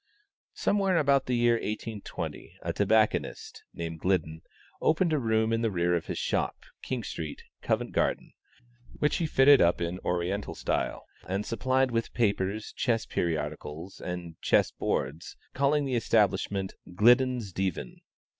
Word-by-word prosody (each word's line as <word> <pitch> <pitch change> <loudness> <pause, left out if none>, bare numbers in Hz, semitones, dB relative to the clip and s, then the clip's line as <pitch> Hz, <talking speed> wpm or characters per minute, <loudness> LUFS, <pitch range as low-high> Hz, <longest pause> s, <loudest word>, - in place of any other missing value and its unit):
Somewhere 195 -3 +2
about 140 -3 +3
the 125 - +1
year 120 0 +4
1820, 110 -1 -5
a - - -2
tobacconist, 105 +1 +1
named 80 -1 -6
Gliddon, 80 -4 0 0.4
opened 165 +1 +2
a 150 - +2
room 110 -2 +1
in 115 - +1
the 115 - +1
rear 90 -2 +1
of 85 - -3
his - - -3
shop, - - 0 0.3
King 125 -3 -3
Street, 80 -6 -6 0.2
Covent - - -1
Garden, - - -1 0.6
which 150 - +1
he 165 - 0
fitted 140 -1 +6
up 85 +1 +3
in 85 +2 -2
Oriental 90 +4 -2
style, - - -2 0.2
and 95 +3 -2
supplied 130 +3 +1
with 115 -1 -2
papers, 105 -2 0
chess 115 -3 0
periodicals 80 +1 -3
and 90 -2 -6
chess - - +3
boards, 70 +5 -3 0.2
calling 140 +2 +2
the 135 - -2
establishment 100 -4 +1 0.2
"Gliddon's 120 -1 +4
Divan." 95 -10 -3
105 Hz, 140 wpm, -28 LUFS, 90-125 Hz, 0.6 s, fitted